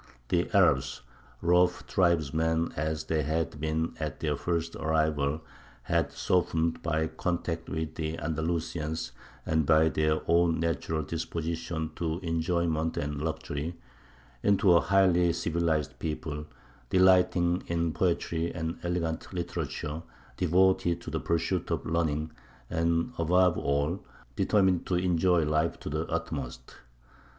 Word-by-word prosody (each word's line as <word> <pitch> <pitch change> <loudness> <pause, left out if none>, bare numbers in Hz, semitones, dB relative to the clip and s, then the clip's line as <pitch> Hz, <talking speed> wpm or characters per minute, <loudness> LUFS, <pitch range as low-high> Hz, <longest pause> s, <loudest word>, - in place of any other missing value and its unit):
The 90 +5 +1
Arabs, 75 - +3 0.4
rough 90 +1 +3
tribesmen 80 -2 +1
as 80 +1 -2
they 80 0 0
had 75 0 -2
been 80 +1 -1
at 75 -2 -4
their 75 -2 0
first 85 +2 -2
arrival, 80 -2 +1 0.4
had - - 0
softened, 85 -2 0
by 80 -1 0
contact 85 0 -3
with 80 -1 -3
the 80 0 -3
Andalusians 80 0 -2 0.3
and 80 0 +2
by 80 +2 +4
their 75 0 +1
own 85 -1 +3
natural 80 -1 -1
disposition 80 0 -3
to 80 -1 -1
enjoyment 85 -1 0
and 75 0 -2
luxury, 80 0 -3 0.7
into 100 -2 +4
a 85 - +6
highly 90 -3 +4
civilized 80 -3 -1
people, 75 -1 -4 0.4
delighting 90 -1 +4
in 85 -1 0
poetry 85 -2 0
and 80 0 -4
elegant 85 -2 -2
literature, 80 -3 -4 0.3
devoted 95 +1 +3
to - - -7
the - - -1
pursuit 85 +2 -1
of 85 -4 -2
learning, 80 -1 0 0.4
and, 85 +6 +1
above 90 +1 +4
all, 70 +6 0 0.3
determined 95 -4 +2
to 90 - +1
enjoy 90 -1 +3
life 75 +2 0
to - - -5
the 80 +2 -2
utmost. 75 -7 -4
80 Hz, 125 wpm, -29 LUFS, 80-85 Hz, 0.7 s, a